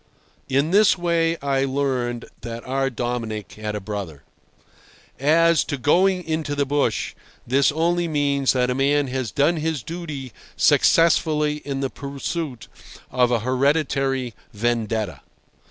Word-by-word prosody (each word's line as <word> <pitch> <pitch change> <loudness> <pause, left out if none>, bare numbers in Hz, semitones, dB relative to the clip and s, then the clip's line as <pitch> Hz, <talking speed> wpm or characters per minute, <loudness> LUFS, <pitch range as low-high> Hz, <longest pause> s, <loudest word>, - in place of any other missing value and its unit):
In 140 +4 +1
this 205 0 +5
way 170 -1 +1
I 135 -1 +1
learned 130 -3 -1 0.2
that 115 0 -7
our 135 +1 0
Dominic 115 -4 -4
had 105 0 -5
a - - -2
brother. 95 -8 -6 1.0
As 165 +4 +4
to 145 - -3
"going 180 +8 +3
into 155 -3 -2
the 140 0 +1
bush," 145 +1 0 0.3
this 135 +4 +3
only 170 +3 +1
means 140 -3 +1
that 125 -1 +1
a - - +1
man 140 +1 +1
has 130 -3 -2
done 145 - +2
his 155 -4 -2
duty 150 -8 -6 0.2
successfully 155 -2 +3
in 140 -2 -4
the 135 - -2
pursuit 140 -1 -5 0.4
of 125 -1 +3
a 120 -3 +1
hereditary 135 -1 0 0.2
vendetta. 110 - -1
140 Hz, 135 wpm, -22 LUFS, 125-155 Hz, 1.0 s, this